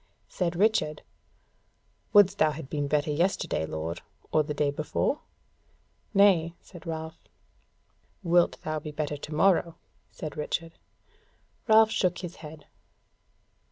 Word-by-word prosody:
Said 175 Hz, -2 st, -2 dB
Richard: 185 Hz, -6 st, +1 dB, 1.1 s
"Wouldst 200 Hz, -1 st, +5 dB
thou 155 Hz, -, +5 dB
have 150 Hz, -3 st, -9 dB
been 145 Hz, -1 st, -1 dB
better 150 Hz, +1 st, +1 dB
yesterday, 160 Hz, -, 0 dB
lord, 80 Hz, +2 st, -4 dB, 0.3 s
or 155 Hz, -, +4 dB
the 150 Hz, 0 st, -4 dB
day 145 Hz, -1 st, +1 dB
before?" 155 Hz, -, -1 dB, 0.9 s
"Nay," 185 Hz, -5 st, +4 dB
said 175 Hz, -3 st, -14 dB
Ralph. 160 Hz, 0 st, -5 dB, 1.0 s
"Wilt 175 Hz, 0 st, +3 dB
thou 155 Hz, 0 st, -2 dB
be 150 Hz, -, -7 dB
better 150 Hz, -1 st, -3 dB
to 145 Hz, -, -9 dB
morrow?" 170 Hz, -1 st, +3 dB, 0.4 s
said 155 Hz, -3 st, -7 dB
Richard. 165 Hz, +2 st, -4 dB, 0.9 s
Ralph 220 Hz, 0 st, +6 dB
shook 180 Hz, -4 st, +1 dB
his 180 Hz, -1 st, -7 dB
head. 155 Hz, -1 st, -11 dB
160 Hz, 120 wpm, -27 LUFS, 150-180 Hz, 1.1 s, Ralph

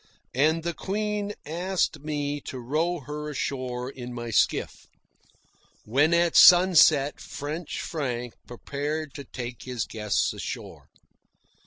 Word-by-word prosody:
And 155 Hz, +5 st, +2 dB
the 170 Hz, 0 st, -2 dB
Queen 210 Hz, +2 st, -2 dB
asked 180 Hz, +4 st, -1 dB
me 145 Hz, -1 st, -3 dB
to 130 Hz, -, -6 dB
row 155 Hz, +7 st, -1 dB
her 150 Hz, +2 st, -6 dB
ashore 130 Hz, -3 st, -3 dB
in 125 Hz, -2 st, -8 dB
my 120 Hz, -1 st, -5 dB
skiff, -, -, 0 dB, 1.0 s
when 140 Hz, +9 st, +3 dB
at 170 Hz, 0 st, +3 dB
sunset 170 Hz, -6 st, +7 dB
French 150 Hz, +3 st, -5 dB
Frank 125 Hz, -6 st, -3 dB
prepared 145 Hz, +4 st, -4 dB
to 140 Hz, -, -7 dB
take 125 Hz, -2 st, -7 dB
his 125 Hz, -3 st, -3 dB
guests 105 Hz, -2 st, -1 dB
ashore. -, -, -7 dB
145 Hz, 120 wpm, -26 LUFS, 125-165 Hz, 1.0 s, sunset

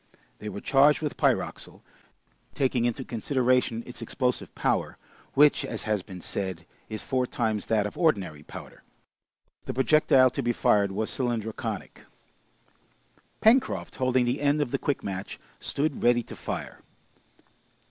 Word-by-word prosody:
They 105 Hz, -, -5 dB
were 100 Hz, -, -6 dB
charged 145 Hz, +3 st, +4 dB
with 150 Hz, -, -2 dB
pyroxyle, -, -, -1 dB, 0.7 s
taking 130 Hz, -3 st, +1 dB
into 120 Hz, +2 st, -1 dB
consideration 125 Hz, -1 st, +1 dB
its 125 Hz, -1 st, -10 dB
explosive 125 Hz, +2 st, -2 dB
power, -, -, 0 dB, 0.4 s
which, 145 Hz, +1 st, +5 dB
as 115 Hz, -, -5 dB
has 105 Hz, -2 st, 0 dB
been 90 Hz, -2 st, -10 dB
said, 95 Hz, -4 st, -4 dB, 0.2 s
is 110 Hz, -1 st, -5 dB
four 130 Hz, -2 st, 0 dB
times 110 Hz, -5 st, -1 dB
that 110 Hz, -2 st, +2 dB
of 105 Hz, -, -5 dB
ordinary 100 Hz, -, +1 dB
powder: -, -, -11 dB, 0.8 s
the -, -, -4 dB
projectile 130 Hz, -1 st, +5 dB
to 140 Hz, -, -2 dB
be 120 Hz, -1 st, 0 dB
fired 100 Hz, -3 st, +3 dB
was 110 Hz, +3 st, -2 dB
cylindroconic. 115 Hz, -4 st, -3 dB, 1.3 s
Pencroft, 250 Hz, +4 st, +3 dB
holding 130 Hz, -1 st, +2 dB
the 125 Hz, +4 st, -1 dB
end 145 Hz, +1 st, +2 dB
of 145 Hz, -5 st, -1 dB
the -, -, 0 dB
quick 145 Hz, -, -1 dB
match, 95 Hz, 0 st, -5 dB, 0.2 s
stood 145 Hz, 0 st, -2 dB
ready 120 Hz, 0 st, +4 dB
to -, -, -10 dB
fire. -, -, -6 dB
120 Hz, 140 wpm, -27 LUFS, 110-135 Hz, 1.3 s, which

